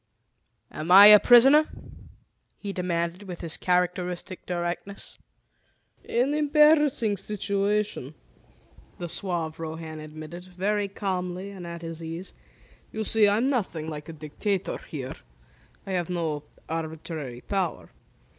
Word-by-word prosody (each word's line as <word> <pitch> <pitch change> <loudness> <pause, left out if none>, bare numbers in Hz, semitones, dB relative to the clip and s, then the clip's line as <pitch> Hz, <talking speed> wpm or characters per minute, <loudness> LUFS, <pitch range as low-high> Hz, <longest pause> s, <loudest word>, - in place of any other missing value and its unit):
"Am 155 +2 -6
I 195 +3 +10
a 210 0 +11
prisoner?" 270 +7 +7 0.9
he 200 -1 -5
demanded 175 0 -2
with 180 -2 -7
his 165 -2 -3
characteristic 180 0 -1
directness. 175 +3 -4 0.9
"An 255 +5 +1
embarassing 295 -7 +4
situation," 200 -5 -1 0.8
the 175 - -5
suave 170 -3 -3
Rohan 160 -1 -6
admitted, 155 +3 -9
very 200 +3 -1
calmly 185 -1 -4
and 185 -3 -8
at 170 0 -7
his 165 0 -6
ease. 165 +3 -6 0.6
"You 220 - -3
see, 215 0 +4
I'm 220 +6 +2
nothing 185 - -2
like 150 +1 -7
a - - -6
dictator 175 +6 -3
here. 130 -4 -6 0.7
I 195 - -6
have 180 -2 -1
no 160 -4 -2 0.2
arbitrary 160 -5 -5
power. 175 - -3
180 Hz, 115 wpm, -26 LUFS, 165-205 Hz, 0.9 s, a